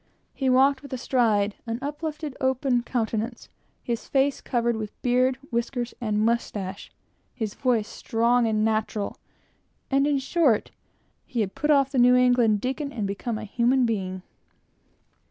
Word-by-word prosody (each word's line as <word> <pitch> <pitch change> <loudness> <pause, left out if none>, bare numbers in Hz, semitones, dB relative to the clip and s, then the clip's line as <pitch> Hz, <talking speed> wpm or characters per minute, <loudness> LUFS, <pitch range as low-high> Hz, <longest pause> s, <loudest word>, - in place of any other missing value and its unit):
He 265 -2 0
walked 265 +1 +4
with 280 - -12
a - - -2
stride, 220 -5 +1
an 230 0 -2
uplifted 300 +1 -5
open 260 -1 +1
countenance, 230 -1 -3 0.3
his 235 -2 -3
face 275 0 +1
covered 235 -1 0
with 215 -1 -6
beard, 255 +1 +2
whiskers, 240 +1 -2
and 215 -2 +1
mustache, 205 -4 -2 0.4
his 215 -4 -3
voice 235 -5 0
strong 235 +1 +1
and 215 -1 +1
natural; 215 -2 -1 0.7
and, 275 +1 +3
in 290 -1 +2
short, 270 -4 +1 0.5
he 240 -4 -2
had 195 -2 -2
put 300 - -2
off 275 -2 +4
the 265 - +1
New 250 +1 +6
England 245 -4 +4
deacon 280 +3 -3
and 220 -6 -3
become 200 +3 -3
a 220 - -6
human 245 +4 +2
being. 185 -5 -2
240 Hz, 150 wpm, -25 LUFS, 220-265 Hz, 0.7 s, New